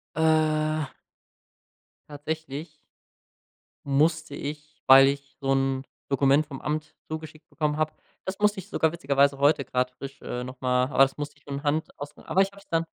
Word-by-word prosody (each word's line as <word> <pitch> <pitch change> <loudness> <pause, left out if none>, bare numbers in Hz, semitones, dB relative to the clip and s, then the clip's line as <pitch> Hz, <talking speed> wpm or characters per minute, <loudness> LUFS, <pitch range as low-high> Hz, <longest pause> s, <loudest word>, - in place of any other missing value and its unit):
Äh 155 -1 +2 1.2
Tatsächlich 150 +1 -6 1.1
musste 155 +1 +1
ich, 150 +1 -7
weil 135 0 +9
ich 140 0 -4
so 135 -1 0
'n 135 0 +1 0.3
Dokument 140 +2 +3
vom 135 -3 -8
Amt 150 0 -3 0.2
zugeschickt 155 0 -7
bekommen 150 -2 -1
habe 155 0 0 0.3
das 190 +1 -4
musste 210 -1 +2
ich 190 +3 -8
sogar 160 -5 +2
witzigerweise 140 -3 +2
heute 140 0 +3
grad 125 0 0
frisch, 135 +2 -9
äh, 125 0 -4
noch 130 0 -9
mal 125 0 +3
aber 135 0 +3
das 135 +2 -6
musste 145 0 -5
ich - - -27
von 140 0 -5
Hand 155 +2 0
ausfüllen, 145 +1 -9
aber 190 - +2
ich 195 0 +2
habe 200 - -15
es 200 - -21
dann 165 0 +1
150 Hz, 170 wpm, -26 LUFS, 135-155 Hz, 1.2 s, weil